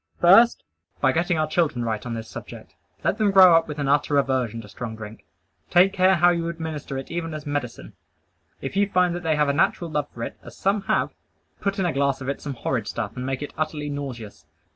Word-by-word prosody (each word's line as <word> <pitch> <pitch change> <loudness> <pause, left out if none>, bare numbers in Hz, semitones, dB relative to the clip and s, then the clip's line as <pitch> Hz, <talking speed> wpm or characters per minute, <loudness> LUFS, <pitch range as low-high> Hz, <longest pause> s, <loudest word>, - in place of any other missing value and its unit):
First, 225 +7 +6 0.4
by 130 - +3
getting 170 +4 0
our 155 - +2
children 155 -7 0
right 110 -2 -2
on 120 -2 -4
this 115 -1 -6
subject. - - -10 0.3
Let 210 - 0
them 215 -2 +3
grow 190 -3 +8
up 165 0 +3
with 150 -1 -6
an 145 -2 -2
utter 145 +1 +2
aversion 130 -5 0
to 105 - -13
strong 110 +2 -7
drink. 110 0 -10 0.4
Take 190 +3 +5
care 185 +1 +4
how 175 0 +5
you 170 -1 -1
administer 160 -4 -5
it 135 - -7
even 165 -2 -3
as 155 0 -7
medicine. 145 -5 -4 0.7
If 135 - -5
you 200 0 +2
find 180 -2 +2
that 175 - -4
they 160 -3 +1
have 150 -1 +2
a 140 - +2
natural 165 +2 +1
love 150 -1 -1
for 115 - -7
it, - - -6
as - - -13
some 200 +2 +1
have, - - +1 0.5
put 200 0 -2
in 190 - 0
a 175 - 0
glass 140 0 +1
of 130 - -5
it 140 - -3
some 140 -2 -5
horrid 115 -2 -2
stuff 105 +2 -4
and 125 0 -4
make 135 +1 -2
it 145 - -7
utterly 150 -2 -2
nauseous. 120 - -7
150 Hz, 230 wpm, -24 LUFS, 130-175 Hz, 0.7 s, grow